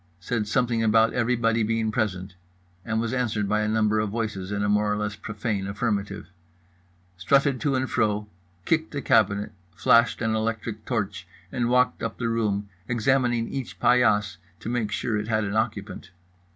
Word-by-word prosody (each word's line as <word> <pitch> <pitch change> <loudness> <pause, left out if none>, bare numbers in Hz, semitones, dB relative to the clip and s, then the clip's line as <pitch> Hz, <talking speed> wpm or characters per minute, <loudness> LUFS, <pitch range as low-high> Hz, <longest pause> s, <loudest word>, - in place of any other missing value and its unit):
Said 105 +4 -2
something 120 0 +1
about 110 +1 +4
everybody 115 -2 +1
being 110 0 0
present, 95 -4 -2 0.5
and 110 0 -1
was 115 +2 -2
answered 110 -5 0
by 105 +1 +1
a 105 - 0
number 110 0 +2
of 105 -1 0
voices 105 -3 -3
in 100 0 -1
a - - +1
more 105 0 +2
or 105 - 0
less 105 0 -2
profane 105 -1 -3
affirmative. 100 -1 -2 0.9
Strutted 135 +8 +2
to 140 -3 +1
and 130 0 0
fro, 105 -3 0 0.4
kicked 160 -1 0
the 140 - -2
cabinet, 100 -1 +2 0.2
flashed 115 +6 +4
an 110 0 +1
electric 110 0 -3
torch, 100 -7 -3 0.2
and 120 -2 0
walked 125 +1 +2
up 115 -1 -3
the 115 -2 -1
room 105 -3 0 0.2
examining 120 0 +1
each 135 -3 -6
paillasse 110 -6 +3 0.2
to - - -6
make 120 -3 -1
sure 110 0 -1
it 105 - -5
had 110 -1 +1
an 100 0 -3
occupant. 110 - -2
110 Hz, 170 wpm, -25 LUFS, 105-120 Hz, 0.9 s, about